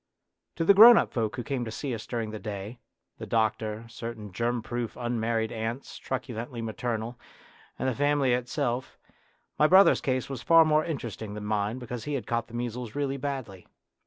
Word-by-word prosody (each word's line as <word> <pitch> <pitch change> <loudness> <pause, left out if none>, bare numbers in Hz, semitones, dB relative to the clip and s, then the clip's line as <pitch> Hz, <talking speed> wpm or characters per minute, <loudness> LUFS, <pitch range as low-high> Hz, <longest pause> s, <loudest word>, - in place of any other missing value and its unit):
To 165 - -1
the 200 - +7
grown 225 +4 +10
up - - +1
folk 110 -3 -1
who 125 - -4
came 135 -2 -2
to 115 - -5
see 130 +4 -4
us 110 -1 -6
during 115 -3 -3
the 110 - -6
day 105 +2 -6 0.4
the - - -6
doctor, 110 0 0
certain 115 -2 -7
germ 120 +4 -1
proof 120 0 -4
unmarried 115 -1 -1
aunts, 115 +4 -4
truculently 120 -2 -5
maternal, 115 +1 -3 0.6
and - - -2
the 130 - +1
family 145 -1 +2
itself 125 0 -2 0.6
my 150 - +6
brother's 190 +4 +6
case 130 -2 -1
was 135 -3 -6
far 165 +2 +6
more 155 0 +3
interesting 110 - -5
than 105 -1 -6
mine 105 +2 -1
because 125 -2 -6
he 150 -1 -2
had 125 -6 -3
caught 115 0 -1
the 120 - -10
measles 120 -1 -4
really 140 -1 -1
badly. 130 -9 -5
120 Hz, 185 wpm, -28 LUFS, 110-135 Hz, 0.6 s, grown